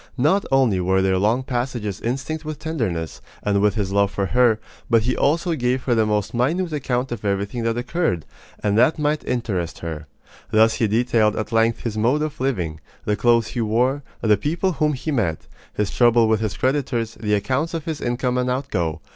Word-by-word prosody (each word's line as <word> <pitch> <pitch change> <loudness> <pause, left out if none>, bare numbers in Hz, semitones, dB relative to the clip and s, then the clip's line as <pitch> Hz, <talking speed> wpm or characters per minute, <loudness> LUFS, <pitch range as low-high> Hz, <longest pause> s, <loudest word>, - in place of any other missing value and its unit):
Not 160 +10 +2
only 130 -8 +3
were 95 +1 +2
there 95 -1 +2
long 110 +6 +2
passages 120 -6 -3
instinct 135 +6 -3
with 155 -1 -5
tenderness, 110 - -3 0.2
and 100 -1 +1
with 105 0 +2
his 100 -3 -1
love 100 0 +3
for 100 0 -2
her; 120 0 +3 0.3
but 115 -2 +4
he 125 - 0
also 165 +4 +1
gave 125 -2 0
her 125 - +1
the 110 -2 +2
most 105 -2 -1
minute 160 +8 0
account 130 -3 -1
of 120 -4 -5
everything 100 +3 -1
that 115 0 0
occurred, 125 - -1 0.4
and 105 -1 +1
that 125 +8 +4
might 150 0 0
interest 105 -9 -2
her. 80 -2 -5 0.4
Thus 110 +1 +4
he 115 - +1
detailed 110 -1 +2
at 110 - -4
length 115 0 +2
his 110 -2 -3
mode 130 +7 +2
of 155 -4 -5
living, 90 - -1 0.3
the 105 - +1
clothes 115 -1 +3
he 120 - -3
wore, 125 +6 +1 0.2
the 105 -2 +4
people 170 - 0
whom 150 -2 +1
he 145 +4 -3
met, 100 - -1 0.3
his 105 -2 -2
trouble 120 -2 +4
with 110 -1 +2
his 110 -2 -3
creditors, 130 -4 0
the 105 -1 +1
accounts 130 - -1
of 160 - -4
his 160 -3 -4
income 125 +1 0
and 125 0 0
outgo. 95 - -2
120 Hz, 195 wpm, -22 LUFS, 105-135 Hz, 0.4 s, but